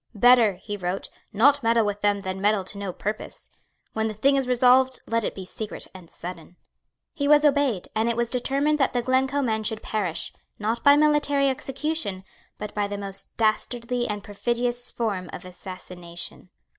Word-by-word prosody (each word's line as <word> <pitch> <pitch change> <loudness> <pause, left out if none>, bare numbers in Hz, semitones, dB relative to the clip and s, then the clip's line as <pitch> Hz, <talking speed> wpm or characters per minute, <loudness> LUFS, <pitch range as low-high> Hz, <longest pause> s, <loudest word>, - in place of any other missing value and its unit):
"Better," 240 -1 +6
he 205 +3 -6
wrote, 185 0 -3 0.2
"not 280 +7 +4
meddle 230 -1 +3
with 205 0 -2
them 205 -1 +2
than 190 0 -4
meddle 205 -1 +2
to 200 +2 -4
no 200 -2 -3
purpose. 210 +4 -6 0.4
When 220 0 0
the 215 - -4
thing 275 +7 +3
is 270 -2 +1
resolved, 255 +1 +4
let 230 0 0
it - - -3
be 190 - -7
secret 215 +3 -5
and 180 -3 -12
sudden." 175 0 -9 0.6
He 285 -3 -1
was 295 +1 +6
obeyed; 275 -9 +2
and 220 +2 +1
it 235 - -1
was 235 0 0
determined 275 +4 +1
that 270 - +2
the 245 -1 0
Glencoe 265 +3 +1
men 220 -3 0
should 220 0 -2
perish, 195 -7 -2 0.2
not 225 +3 -2
by 285 0 +8
military 290 -2 +3
execution, 270 -6 -3 0.3
but 210 0 -6
by 205 -1 0
the 205 0 -4
most 195 -1 -5
dastardly 240 +2 0
and 205 -1 -3
perfidious 240 +3 -1
form 200 -7 -2
of 180 - -8
assassination. 180 -1 -8
225 Hz, 180 wpm, -25 LUFS, 200-260 Hz, 0.6 s, by